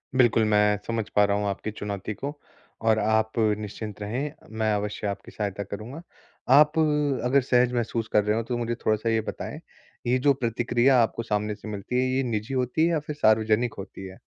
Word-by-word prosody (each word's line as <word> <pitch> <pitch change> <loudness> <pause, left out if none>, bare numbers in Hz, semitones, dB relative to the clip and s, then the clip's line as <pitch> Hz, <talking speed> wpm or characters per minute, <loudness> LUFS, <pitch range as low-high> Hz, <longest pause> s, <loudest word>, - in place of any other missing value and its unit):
बिल्कुल। 120 -3 +4
मैं 105 0 +4
समझ 115 -2 -2
पा 105 - +6
रहा 100 0 +1
हूँ 105 - -1
आपकी 100 +2 -3
चुनौती 105 0 -5
को 145 +7 -6 0.4
और 110 -1 +3
आप 110 0 +2
निश्चिंत 105 -1 -2
रहें, 125 +8 -3 0.2
मैं 110 -1 0
अवश्य 105 0 -2
आपकी 100 0 -5
सहायता 100 -1 -3
करूँगा। 110 - -7 0.5
आप 150 +2 +5 0.5
अगर 135 +3 +4
सहज 125 -1 +2
महसूस 115 -1 -1
कर 105 - +5
रहे 105 +1 +1
हों 115 - -1
तो 120 +1 -3
मुझे 120 0 -2
थोड़ा-सा 110 +1 +1
ये 115 -1 +2
बताएँ, - - -6 0.5
ये 125 +1 +3
जो 140 +2 +4
प्रतिक्रिया 120 +1 +2
आपको 115 0 -1
सामने 105 -1 -1
से 110 - -11
मिलती 105 +4 -2
है, 130 - +1
ये 135 - +1
निजी 115 +1 -3
होती 130 +5 +1
है - - +2
या 160 - +1
फिर 150 0 -6
सार्वजनिक 110 -1 +2
होती 95 0 -8
है? 95 0 -12
110 Hz, 195 wpm, -26 LUFS, 105-125 Hz, 0.5 s, पा